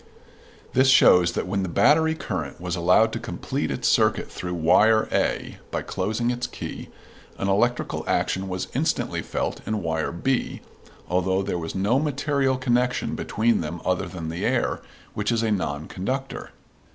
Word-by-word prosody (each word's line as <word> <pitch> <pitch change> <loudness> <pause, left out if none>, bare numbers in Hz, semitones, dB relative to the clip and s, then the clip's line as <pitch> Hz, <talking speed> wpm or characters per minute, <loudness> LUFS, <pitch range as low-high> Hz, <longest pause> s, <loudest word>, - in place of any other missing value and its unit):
This 130 +1 +4
shows 90 -9 +6
that - - -2
when 100 +2 -1
the 95 - -2
battery 160 - +4
current 85 - -5
was 90 0 -3
allowed 90 +6 +4
to - - -2
complete - - -3
its - - -1
circuit - - +2
through 90 -1 -4
wire 110 +7 +4
A - - -1
by - - -3
closing 110 +6 -1
its 120 0 -3
key, - - -7 0.5
an 100 - -2
electrical 120 +5 +1
action 95 +1 0
was 90 0 -3
instantly - - 0
felt - - -3
in 105 -3 -2
wire 80 -1 -1
B, 130 +10 -1 0.5
although 95 +2 +1
there 95 -3 -2
was 80 -1 -5
no 105 +7 +2
material 140 -2 0
connection 125 -1 0
between 110 -1 +1
them 85 +2 -5
other 90 -1 0
than 85 -3 -6
the 85 +2 -4
air, - - 0 0.3
which 105 +2 -1
is 115 -1 +1
a 110 - +1
non 75 -7 -2
conductor. 130 +8 -4
100 Hz, 165 wpm, -24 LUFS, 90-120 Hz, 0.5 s, shows